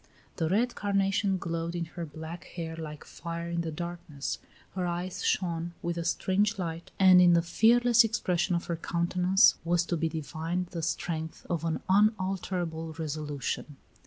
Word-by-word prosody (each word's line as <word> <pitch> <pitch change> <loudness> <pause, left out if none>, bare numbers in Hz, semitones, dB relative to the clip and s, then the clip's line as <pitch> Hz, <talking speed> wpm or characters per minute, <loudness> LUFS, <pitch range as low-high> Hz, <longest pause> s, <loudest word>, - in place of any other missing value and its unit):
The 160 - 0
red 235 +6 +2
carnation 195 -1 +1
glowed 165 0 -3
in 170 -1 -2
her 170 -2 -5
black 160 +3 -8
hair 165 -2 -6
like 155 -2 -7
fire 170 0 -6
in 170 0 0
the 165 - -3
darkness; 170 -3 -5 0.3
her 185 -2 -1
eyes 175 +1 -3
shone 170 -2 0
with 170 0 -1
a 170 - -2
strange 200 +5 +1
light, 170 -2 -4
and 185 -1 +8
in 175 -1 +7
the 170 0 +4
fearless 235 +6 +5
expression 185 -5 0
of 170 - -2
her 170 - -2
countenance 180 +4 +3
was 170 0 +2
to 175 - -1
be 160 +1 0
divined 160 +3 -3
the 170 - -4
strength 160 0 -3
of 170 -2 -1
an 160 -1 -1
unalterable 185 -5 +1
resolution. 150 -2 -4
170 Hz, 160 wpm, -29 LUFS, 165-185 Hz, 0.3 s, and